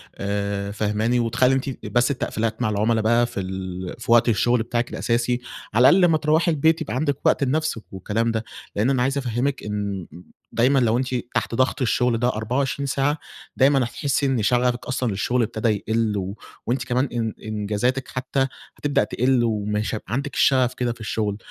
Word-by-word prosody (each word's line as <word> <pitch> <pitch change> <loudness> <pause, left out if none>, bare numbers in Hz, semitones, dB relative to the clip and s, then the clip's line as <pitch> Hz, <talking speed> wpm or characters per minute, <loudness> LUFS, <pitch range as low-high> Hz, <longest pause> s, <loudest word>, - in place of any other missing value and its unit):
آآ، 100 0 -2
فهماني؟ 110 +3 0
وتخلّي 120 +2 +2
أنتِ 135 0 -4
بس 120 +2 +2
التقفيلات 115 -4 -2
مع 115 - +1
العُملا 110 +2 +1
بقى 115 +2 +3
في 120 -4 -5
ال 95 -1 -5
في 115 - -3
وقت 120 0 +6
الشغل 120 +1 +2
بتاعِك 120 +1 -2
الأساسي، 120 +1 0 0.3
على 120 +4 +7
الأقل 190 - +5
لمّا 160 -2 +3
تروّحي 155 +2 +2
البيت 160 +2 +2
يبقى 150 - -3
عندِك 145 0 0
وقت - - +3
لنفسِك 140 -4 -1
والكلام 110 +4 -1
ده. 110 0 -2 0.3
لإن 105 +5 +2
أنا 130 -2 +2
عايز 135 +2 0
أفهِّمِك 130 +1 -1
إن 100 -3 -3 0.5
دايمًا 130 +4 +3
لو 115 -2 +2
أنتِ 130 0 -1 0.2
تحت - - 0
ضغط 130 +3 +1
الشغل 125 -1 +2
ده 120 - +2
24 125 +5 -1
ساعة، 140 +2 +1 0.4
دايمًا 135 +1 +5
هتحسّي 140 +4 -1
إن 130 -4 +1
شغفِك 125 +2 +1
أصلًا 130 -2 -1
للشغل 110 +6 0
أبتدى 110 +1 -1
يقِل 110 0 0
و 95 +1 -4 0.3
وأنتِ 125 +2 0
كمان 125 +1 +1
إن 115 -3 -1
إنجازاتِك 110 +5 -1
حتّى 135 +1 -1 0.3
هتبدأ 145 -5 +1
تقِل 125 +3 +1
ومش 105 -1 -1
هيبقى 110 0 -7
عندِك 140 +3 -2
الشغف 130 -2 +3
كده 125 -1 -1
في 115 - -19
الشغل. 105 -2 -2
120 Hz, 180 wpm, -23 LUFS, 110-130 Hz, 0.5 s, على